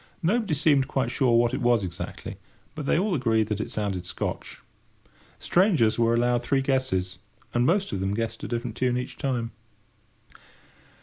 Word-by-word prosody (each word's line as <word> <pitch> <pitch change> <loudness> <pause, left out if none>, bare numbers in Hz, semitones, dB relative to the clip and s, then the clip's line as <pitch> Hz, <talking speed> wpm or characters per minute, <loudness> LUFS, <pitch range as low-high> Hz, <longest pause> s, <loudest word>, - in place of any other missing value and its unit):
Nobody 200 -1 +1
seemed 140 -2 +3
quite 130 -3 -1
sure 125 -4 +3
what 120 0 +2
it - - -2
was 120 -3 +3
exactly, 90 -1 -6 0.4
but 150 -3 -6
they - - +3
all 195 +2 +1
agreed 110 -7 +1
that 105 -1 -1
it - - -4
sounded 100 -4 -2
Scotch. 90 - -5 0.8
Strangers 165 - +3
were 115 0 +3
allowed 120 0 +2
three 135 +2 +1
guesses, 130 -9 -1 0.3
and 120 +1 +2
most 195 +4 +1
of 95 - -2
them 95 +1 -1
guessed 115 0 -3
a - - -3
different 120 -1 -3
tune 125 -1 +1
each 125 - -5
time. 120 -4 -1
120 Hz, 170 wpm, -26 LUFS, 110-135 Hz, 0.8 s, seemed